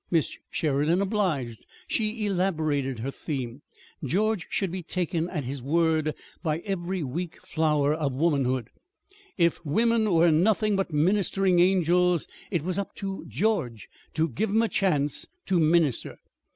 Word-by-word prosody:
Miss 165 -4 +1
Sheridan 150 +3 +1
obliged. 180 - -1 0.2
She 215 0 -1
elaborated 155 - 0
her 125 +5 -3
theme. 135 -3 -5 0.4
George 195 - 0
should 195 -4 0
be 185 +1 -4
taken 170 -1 -2
at 155 -6 -3
his 135 +1 -5
word 155 +1 +1 0.3
by 155 -3 0
every 185 -3 -3
weak 165 +6 -4
flower 150 -2 +2
of 150 -4 -1
womanhood. 130 -6 +1 0.7
If 170 -2 +2
women 220 +7 +2
were 170 0 +5
nothing 210 +6 +3
but 195 -3 -1
ministering 185 +3 +2
angels, 180 -1 +3 0.2
it 170 -7 -1
was 185 +2 -1
"up 200 - -5
to" 195 -1 -5
George 165 - -1 0.3
to 160 +1 +2
give 165 - -2
'em 220 +3 +3
a - - +2
chance 150 -7 0 0.2
to 185 -2 +2
minister. 155 -5 +2
170 Hz, 140 wpm, -26 LUFS, 150-195 Hz, 0.7 s, were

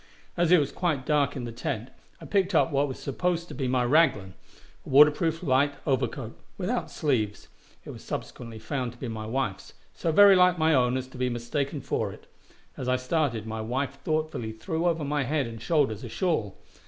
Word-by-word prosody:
As 175 -1 +2
it 180 - +8
was 140 -2 -1
quite 155 -7 -1
dark 145 -2 +1
in 130 - -4
the 120 - -5
tent, 115 +1 -4 0.3
I - - -10
picked 195 -2 +1
up 165 - +4
what 140 +1 +2
was 130 - -6
supposed 170 +4 -2
to - - -7
be 130 -1 -2
my 125 0 +1
"raglan," 120 - +3 0.5
a - - -11
water 150 +3 +8
proof, 165 +2 -2
light 140 -1 +2
overcoat, 130 -4 -1 0.2
without - - -2
sleeves; 110 -9 -1 0.4
it - - -7
was - - -11
subsequently 115 -2 -6
found 125 +1 -3
to - - -18
be 130 - -5
my 110 -1 -5
wife's, 115 -5 -3 0.2
so 165 - -1
very 200 +3 +8
like 180 -1 +5
my 160 0 +3
own 125 -2 +3
as 130 0 -4
to 130 - -12
be 125 0 +1
mistaken 135 +4 -3
for - - -2
it; - - -14 0.5
as 130 - -4
I 130 - +3
started, 130 -4 -1
my 110 0 -4
wife 135 +5 -3
thoughtfully 155 -8 -2
threw 160 +10 -2
over 165 -2 0
my 145 +1 0
head 140 +1 0
and 115 -1 -8
shoulders 135 -10 +1
a 120 - -6
shawl. 115 - -1
135 Hz, 205 wpm, -27 LUFS, 120-155 Hz, 0.5 s, it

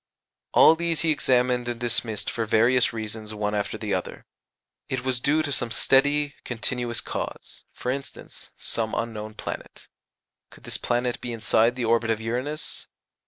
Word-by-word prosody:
All - - +8
these 170 -1 -1
he 160 - +3
examined 125 -3 +2
and 120 -1 -4
dismissed 115 -3 -1
for 115 - -2
various 120 +4 +4
reasons 110 -1 -5
one 105 0 -1
after 105 -1 -2
the - - -3
other. - - -4 0.6
It 130 -1 -2
was 130 -1 +1
due 150 +5 +2
to 145 - -3
some 120 -3 0
steady 145 +5 +3
continuous 120 0 -1
cause - - -6
for 125 - -3
instance, 140 +1 -7
some 110 -1 -1
unknown 110 -2 -4
planet. - - -7 0.6
Could - - -17
this - - -2
planet 120 0 -1
be 120 - -4
inside 115 +1 +2
the 125 -2 -2
orbit 115 0 +2
of 110 -1 +1
Uranus? 125 +7 -3
120 Hz, 160 wpm, -25 LUFS, 110-130 Hz, 0.6 s, All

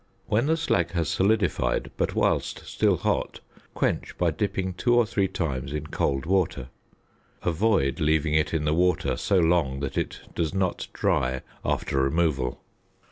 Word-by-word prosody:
When 115 +6 +1
the 160 +1 +2
slag 95 - 0
has 85 -3 0
solidified, 95 +6 +1
but - - -1
whilst - - 0
still - - +1
hot, - - -1 0.4
quench - - -1
by 85 -2 +2
dipping 95 +1 -2
two 120 +7 +2
or 120 -1 +5
three 100 -3 0
times 70 -7 -3
in 75 0 -3
cold 70 -2 -1
water. 85 -8 0 0.7
Avoid 85 -5 +1
leaving 80 -1 +2
it 75 0 +2
in 80 -2 -1
the 75 - +2
water 90 +2 +2
so 100 - +1
long 80 -6 +2
that 70 - -2
it - - -4
does 85 +2 -1
not 95 -2 -1
dry 65 0 0 0.2
after 70 - 0
removal. 70 -3 0
85 Hz, 155 wpm, -26 LUFS, 70-95 Hz, 0.7 s, or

